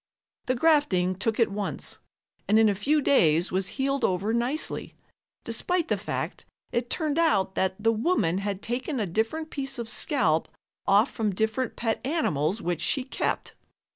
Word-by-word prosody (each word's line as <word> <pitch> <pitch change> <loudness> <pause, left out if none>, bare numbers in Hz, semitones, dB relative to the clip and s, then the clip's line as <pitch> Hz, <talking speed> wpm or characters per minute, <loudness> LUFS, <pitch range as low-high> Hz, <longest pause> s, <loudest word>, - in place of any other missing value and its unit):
The 255 - +2
grafting 245 - +3
took 220 +5 -2
at 230 - +4
once 205 0 -4 0.5
and 215 - +4
in 220 0 +6
a - - +2
few 285 +9 +1
days 170 - +4
was 190 +1 0
healed 275 +1 0
over 190 +4 +1
nicely, 250 +7 -2 0.5
despite 355 -2 0
the - - +3
fact - - -4 0.3
it 240 0 -1
turned 310 0 0
out 195 - +2
that 190 -1 0
the 225 +2 +3
woman 215 - +1
had 200 -1 -3
taken 255 +3 -2
a 210 - +1
different 225 - -2
piece 270 -1 -4
of 235 -2 -4
scalp 225 - +1 0.4
off 205 +6 +4
from 210 -4 -1
different 220 +4 -1
pet 225 -2 -1
animals 210 - 0
which 175 -2 -1
she 270 - +1
kept. 260 - -2
225 Hz, 165 wpm, -27 LUFS, 190-275 Hz, 0.5 s, in